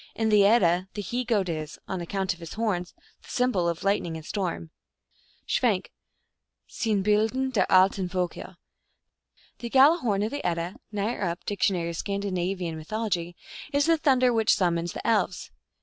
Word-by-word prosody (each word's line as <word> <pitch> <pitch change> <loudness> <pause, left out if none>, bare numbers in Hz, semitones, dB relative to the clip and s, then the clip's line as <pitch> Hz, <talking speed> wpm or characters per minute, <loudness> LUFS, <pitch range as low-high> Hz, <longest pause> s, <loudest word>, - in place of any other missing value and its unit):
In 225 -1 0
the 210 -1 +5
Edda 185 -5 +3
the 205 - -3
he 245 +6 -2
goat 215 -6 +1
is, 155 -2 -4
on 185 -2 -3
account 190 +2 -2
of 170 - -16
his 165 -2 -8
horns, 200 -6 -2 0.3
the - - -17
symbol 245 -9 +1
of 170 0 -4
lightning 195 -5 0
and 160 - -10
storm. 175 -5 -3 0.7
(Schwenk, - - 0 0.8
Sinnbil 210 -1 +1
den 265 +2 -2
der 230 - +2
alten 185 0 +4
Volker.) 180 0 -4 1.0
The 235 - -5
Giala 280 +7 +6
horn 205 -6 0
of 215 - -2
the 285 - -4
Edda 170 +1 -2
(Nyer 210 +3 -2
up. 175 -1 -3
Diet. 175 -4 0
Scan. 200 +4 -3
Mythol.) 180 0 -3 0.4
is 285 0 +3
the 330 0 +4
thunder 255 -5 +3
which 225 -1 +3
summons 175 -2 0
the - - -7
Elves. 225 -2 0
195 Hz, 160 wpm, -26 LUFS, 175-225 Hz, 1.0 s, Giala